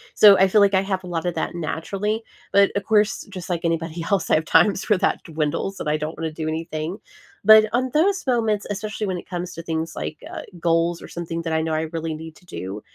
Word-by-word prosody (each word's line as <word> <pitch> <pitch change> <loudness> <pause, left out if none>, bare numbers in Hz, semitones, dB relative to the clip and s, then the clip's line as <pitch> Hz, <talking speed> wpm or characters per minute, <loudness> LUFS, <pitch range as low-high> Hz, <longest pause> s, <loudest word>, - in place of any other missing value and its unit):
So, 205 -2 +9
I 190 - +6
feel 210 +2 +4
like 200 0 +4
I 190 - +4
have 195 -1 -2
a - - -8
lot 170 -2 -3
of 175 - -2
that - - -2
naturally, 195 +6 -3 0.3
but, 200 0 +5
of 200 -1 -1
course, 210 0 +2
just 185 -2 -6
like 170 -1 -1
anybody 165 0 -2
else, 200 -4 +1
I - - +6
have 155 - 0
times 200 +4 +3
where 210 - +5
that - - 0
dwindles 160 +4 -2
that - - -5
I 150 0 +2
don't 155 +2 -5
wanna 160 -1 -3
do 155 0 -5
anything, 160 +2 -3 0.5
but 215 +1 +8
on 255 +2 0
those 380 +5 +2
moments, 225 -5 +1
especially 210 +1 -3
when 185 -3 -2
it - - -14
comes 180 0 -4
to 165 - -7
things 160 0 -3
like, 155 - -4
uh, - - -6 0.2
goals 165 0 +1
or - - -10
something 165 -1 -5
that 165 -1 -2
I 160 - +2
know 160 0 -2
I 155 - 0
really 165 -1 -3
need 160 0 -9
to - - -21
do, 95 - -6
175 Hz, 245 wpm, -23 LUFS, 160-200 Hz, 0.5 s, So